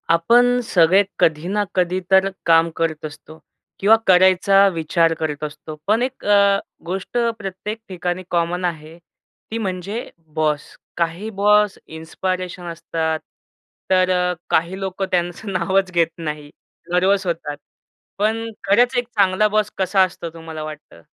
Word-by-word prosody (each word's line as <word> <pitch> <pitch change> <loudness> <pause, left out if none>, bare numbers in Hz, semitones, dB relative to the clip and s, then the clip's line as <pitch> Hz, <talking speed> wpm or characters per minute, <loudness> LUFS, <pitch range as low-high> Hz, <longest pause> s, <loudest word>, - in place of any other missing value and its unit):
आपण 240 +9 +4
सगळे 185 -1 +4 0.2
कधी 160 +1 +2
ना 205 +2 0
कधी 180 0 +1
तर 190 0 +5 0.2
काम 165 0 +5
करत 160 -2 -2
असतो 155 +1 -10 0.4
किंवा 210 +3 +6
करायचा 190 +2 +5
विचार 165 0 +1
करत 155 -2 -3
असतो, 150 +1 -7
पण 215 +3 +3
1 260 +1 -5
अ, 200 -1 +4 0.3
गोष्ट 190 +6 -4 0.2
प्रत्येक 200 +2 -5
ठिकाणी 180 0 -3
कॉमन 175 +1 0
आहे, 160 -1 -5 0.5
ती 225 - -2
म्हणजे 200 +2 -4 0.3
बॉस. 155 -2 +1 0.4
काही 170 +5 -2
बॉस 210 0 +3
इन्स्पिरेशन 180 +3 -4
असतात, 160 -1 -2 0.7
तर 185 -1 +3
अ, 180 0 +1 0.2
काही 170 +4 +1
लोकं 190 0 -3
त्यांचं 180 +3 -2
नावच 190 +1 +1
घेत 170 -2 +3
नाही. 150 -3 -5 0.4
नर्व्हस 190 +2 +2
होतात. 165 -4 -3 0.6
पण 220 +3 0 0.2
खरंच 240 +6 +3
एक 245 -1 0
चांगला 200 0 +3
बॉस 215 0 0
कसा 190 0 +2
असतो 175 -2 -4
तुम्हाला 160 -1 -8
वाटतं? 155 -1 -10
185 Hz, 135 wpm, -20 LUFS, 165-200 Hz, 0.7 s, किंवा